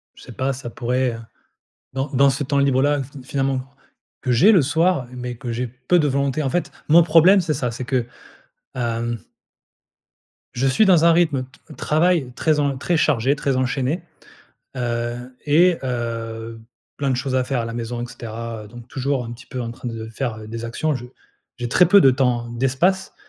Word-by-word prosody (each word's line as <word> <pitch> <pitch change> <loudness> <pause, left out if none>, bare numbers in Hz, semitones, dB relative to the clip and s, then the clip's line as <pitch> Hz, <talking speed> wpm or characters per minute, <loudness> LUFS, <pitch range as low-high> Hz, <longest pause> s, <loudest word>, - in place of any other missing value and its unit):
Je - - -15
sais 120 - -11
pas, 135 +3 -1
ça 125 -2 -7
pourrait, 125 +2 -1
heu, - - -7 0.8
dans 135 +2 -2
dans 140 +1 +5
ce 140 +2 -1
temps 140 +1 0
libre-là, 140 +1 +2
fi 135 0 -12
finalement, 135 -1 -1 0.6
que 125 - -1
j'ai 160 - +6
le 185 -7 +6
soir 160 -1 +1
mais 125 -1 -5
que 120 +1 -6
j'ai 125 +2 -2
peu 130 +9 +1
de 150 - +2
volonté. 140 +2 0
En 135 - 0
fait, 175 +3 -1 0.2
mon 170 +2 +7
problème, 170 +4 +6
c'est 165 -3 -1
ça, 125 -4 -2
c'est 120 +2 -6
que, 130 -3 0 0.7
hem 120 -1 -2 1.3
Je 125 +2 0
suis 135 +11 +4
dans 170 -4 +5
un 170 - +6
rythme 160 -6 +2 0.2
t - - -12
travail 155 -4 +1
très 155 -2 +1
en 140 -2 0
très 170 +4 0
chargé, 140 -2 +2
très 135 -2 -1
enchaîné, 130 +5 -1 0.7
heu, 120 +1 -3
et 170 +4 +4
heu, 115 -2 -4 0.4
plein 140 -1 -1
de 130 - +1
choses 130 +1 -2
à 130 -1 +2
faire 130 -1 -1
à 115 - -2
la 115 - -5
maison 120 0 -4
et - - -3
cetera 115 -2 -7
donc 120 +1 -12
toujours 135 -1 -2
un 115 - -6
petit 125 +2 -12
peu 130 0 -5
en 115 -1 -4
train 120 +1 -7
de 110 -1 -6
faire 110 -3 -4
des 115 +1 -6
actions. 145 +6 -1
Je 125 -1 -6 0.5
j'ai 120 -1 -3
très 180 +8 +5
peu 200 +4 +7
de 135 - +7
temps, 125 -2 0
d'espace 135 +11 0
130 Hz, 195 wpm, -21 LUFS, 120-145 Hz, 1.3 s, mon